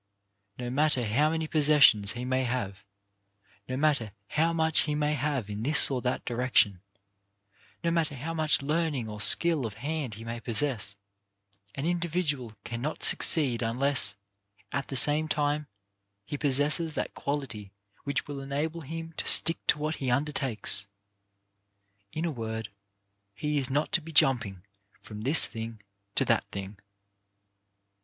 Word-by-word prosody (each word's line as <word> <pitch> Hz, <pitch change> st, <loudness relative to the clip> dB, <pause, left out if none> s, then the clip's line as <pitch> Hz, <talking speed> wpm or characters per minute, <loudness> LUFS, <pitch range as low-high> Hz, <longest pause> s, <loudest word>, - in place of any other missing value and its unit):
No 125 Hz, -1 st, -5 dB
matter 145 Hz, -2 st, +1 dB
how 135 Hz, +9 st, +2 dB
many 160 Hz, 0 st, -2 dB
possessions 145 Hz, -10 st, +4 dB
he 125 Hz, +1 st, -6 dB
may 130 Hz, +1 st, 0 dB
have, 100 Hz, -6 st, -4 dB, 0.9 s
no 130 Hz, -, -3 dB
matter 140 Hz, -8 st, 0 dB, 0.2 s
how 165 Hz, +2 st, +1 dB
much 160 Hz, -1 st, +2 dB
he 150 Hz, -, -1 dB
may 150 Hz, 0 st, 0 dB
have 140 Hz, -5 st, -2 dB
in 105 Hz, 0 st, -6 dB
this 145 Hz, +4 st, +3 dB
or 130 Hz, -2 st, -2 dB
that 125 Hz, 0 st, -3 dB
direction, 120 Hz, -6 st, +1 dB, 1.0 s
no 170 Hz, -, +1 dB
matter 160 Hz, -3 st, -1 dB
how 150 Hz, +6 st, -5 dB
much 155 Hz, -3 st, +1 dB
learning 150 Hz, -5 st, -1 dB
or 105 Hz, 0 st, -7 dB
skill 165 Hz, +3 st, +6 dB
of 110 Hz, -4 st, -5 dB
hand 140 Hz, -1 st, -4 dB
he 110 Hz, -, -10 dB
may 115 Hz, +1 st, -6 dB
possess, 115 Hz, -4 st, -2 dB, 0.8 s
an 135 Hz, -, -4 dB
individual 165 Hz, -9 st, -2 dB
cannot 120 Hz, +6 st, -4 dB
succeed 135 Hz, -8 st, +4 dB
unless, 120 Hz, -3 st, 0 dB, 0.6 s
at 140 Hz, -1 st, -3 dB
the 135 Hz, -, -6 dB
same 150 Hz, +4 st, +3 dB
time, 150 Hz, -1 st, -1 dB, 0.6 s
he 145 Hz, -, -5 dB
possesses 150 Hz, +3 st, 0 dB
that -, -, -3 dB
quality 135 Hz, -9 st, -5 dB, 0.3 s
which 140 Hz, -, -2 dB
will 145 Hz, -1 st, -6 dB
enable 145 Hz, +4 st, -4 dB
him 165 Hz, +2 st, -7 dB
to -, -, -1 dB
stick 165 Hz, -, +7 dB
to -, -, +4 dB
what 155 Hz, +1 st, -3 dB
he 135 Hz, -, -3 dB
undertakes. 125 Hz, -6 st, +3 dB, 1.2 s
In 160 Hz, +2 st, -3 dB
a 170 Hz, -, -1 dB
word 110 Hz, -4 st, -5 dB, 0.7 s
he 150 Hz, +3 st, -1 dB
is 135 Hz, -1 st, -2 dB
not 145 Hz, +3 st, -1 dB
to 175 Hz, -, +1 dB
be 165 Hz, +1 st, -10 dB
jumping 115 Hz, -, +2 dB, 0.4 s
from 105 Hz, -1 st, -10 dB
this 140 Hz, +8 st, +5 dB
thing 115 Hz, 0 st, -7 dB, 0.4 s
to -, -, +1 dB
that -, -, +1 dB
thing. 100 Hz, +1 st, -8 dB
140 Hz, 150 wpm, -28 LUFS, 115-155 Hz, 1.2 s, stick